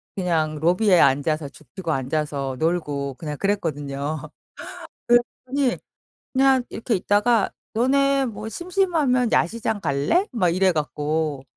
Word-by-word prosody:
그냥 165 Hz, -5 st, 0 dB
로비에 180 Hz, +5 st, +3 dB
앉아서 145 Hz, +2 st, +2 dB
죽치고 155 Hz, +4 st, -7 dB
앉아서 140 Hz, -1 st, -2 dB
놀고 145 Hz, -5 st, -1 dB
그냥 150 Hz, 0 st, -6 dB
그랬거든요. 150 Hz, -6 st, -2 dB, 0.9 s
그랬더니 250 Hz, +2 st, +1 dB, 0.6 s
그냥 265 Hz, -1 st, +4 dB
이렇게 225 Hz, +1 st, -2 dB
있다가 205 Hz, +3 st, +2 dB, 0.2 s
"너네 275 Hz, +3 st, +2 dB
뭐 215 Hz, -2 st, -6 dB
심심하면 320 Hz, -, 0 dB
야시장 220 Hz, +3 st, 0 dB
갈래?" 145 Hz, -, +1 dB
막 185 Hz, -8 st, +2 dB
이래 185 Hz, +2 st, +3 dB
갖고. 150 Hz, -2 st, -2 dB
180 Hz, 270 characters per minute, -23 LUFS, 150-240 Hz, 0.9 s, 그냥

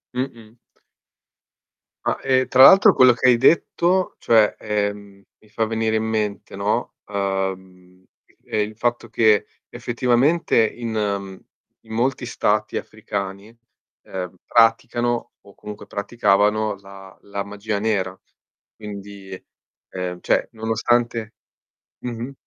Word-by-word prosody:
Mh-mh. 115 Hz, -3 st, -5 dB, 1.5 s
Ah, -, -, 0 dB
e 130 Hz, -1 st, +2 dB
tra 130 Hz, 0 st, +4 dB
l'altro 195 Hz, +1 st, +8 dB
quello 130 Hz, -1 st, +6 dB
che 125 Hz, +2 st, +3 dB
hai 120 Hz, -, +5 dB
detto, 170 Hz, +6 st, +2 dB
cioè, 110 Hz, -2 st, +3 dB
ehm, 100 Hz, -1 st, -3 dB, 0.2 s
mi 110 Hz, -, -24 dB
fa 110 Hz, +1 st, -1 dB
venire 110 Hz, 0 st, -1 dB
in 110 Hz, -, 0 dB
mente, 110 Hz, -2 st, -3 dB
no, -, -, -1 dB
uhm, 95 Hz, -2 st, -4 dB, 0.4 s
ehm, 110 Hz, -, -2 dB
il 105 Hz, +1 st, -4 dB
fatto 120 Hz, -1 st, -1 dB
che 110 Hz, -3 st, +3 dB, 0.2 s
effettivamente 125 Hz, +7 st, +1 dB
in, 115 Hz, 0 st, -6 dB
mhmm, 100 Hz, -3 st, -3 dB, 0.4 s
in 110 Hz, -, -16 dB
molti 125 Hz, +4 st, -1 dB
stati -, -, 0 dB
africani, 100 Hz, 0 st, -5 dB, 0.6 s
ehm, 90 Hz, -1 st, -6 dB
praticano 120 Hz, +1 st, +2 dB
o 100 Hz, -, -18 dB
comunque 105 Hz, 0 st, -10 dB
praticavano 105 Hz, 0 st, +1 dB
la 95 Hz, -1 st, -14 dB
la 100 Hz, 0 st, -5 dB
magia 105 Hz, +1 st, -4 dB
nera. 100 Hz, -4 st, -1 dB, 0.6 s
Quindi 100 Hz, -2 st, -9 dB, 0.5 s
ehm, 90 Hz, -1 st, -5 dB
cioè, -, -, +1 dB
nonostante 115 Hz, 0 st, -1 dB, 0.7 s
mh-mh. 120 Hz, +2 st, -6 dB
110 Hz, 115 wpm, -22 LUFS, 100-120 Hz, 1.5 s, l'altro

